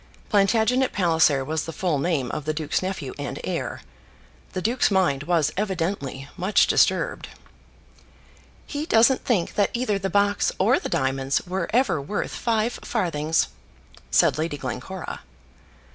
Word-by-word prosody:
Plantagenet 225 +5 +3
Palliser 160 -7 +3
was 155 +2 -2
the 165 - -5
full 165 -2 -1
name 140 -5 0
of 150 - -4
the 155 0 -1
duke's 155 -2 -1
nephew 185 -8 -4
and 145 - -4
heir. - - -3 0.7
The 185 - -2
duke's 240 +4 +2
mind 180 -9 +2
was 155 -1 +1
evidently 170 -8 -2
much 190 +4 +3
disturbed. - - +2 1.4
"He 295 +2 -4
doesn't 235 +1 +4
think 200 -9 0
that 205 -2 +2
either 220 -5 0
the 195 0 -2
box 205 +1 +2
or 230 +8 +3
the - - -5
diamonds 135 +1 0
were 180 -1 -3
ever 225 - +2
worth 205 +9 -3
five 230 0 -1
farthings," 165 -7 0 0.6
said - - +3
Lady 155 -2 -2
Glencora. 140 +7 -6
180 Hz, 140 wpm, -24 LUFS, 150-210 Hz, 1.4 s, doesn't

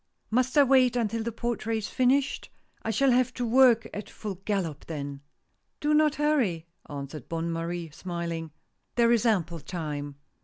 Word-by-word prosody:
" - - -49
Must 255 +4 +1
I 290 - +9
wait 255 -2 +4
until 230 -1 0
the 235 +1 -2
portrait 230 -1 -2
is 215 - -3
finished? 260 +2 +1 0.3
I - - -4
shall 270 +4 +3
have 250 0 +3
to 245 - -1
work 240 -1 +5
at 210 - -6
full 210 -3 -5
gallop 180 -8 -2
then! 140 -3 -5 0.3
" - - -48
"Do 295 +1 +1
not 300 -1 +4
hurry," 260 - +1 0.2
answered 140 -1 -7
Bonne 165 0 -2
Marie, 165 0 -3
smiling. 170 -1 -4 0.2
" - - -49
There 235 -1 +4
is 235 0 +3
ample 170 -6 +1
time." 145 -4 -5
215 Hz, 180 wpm, -28 LUFS, 165-250 Hz, 0.3 s, I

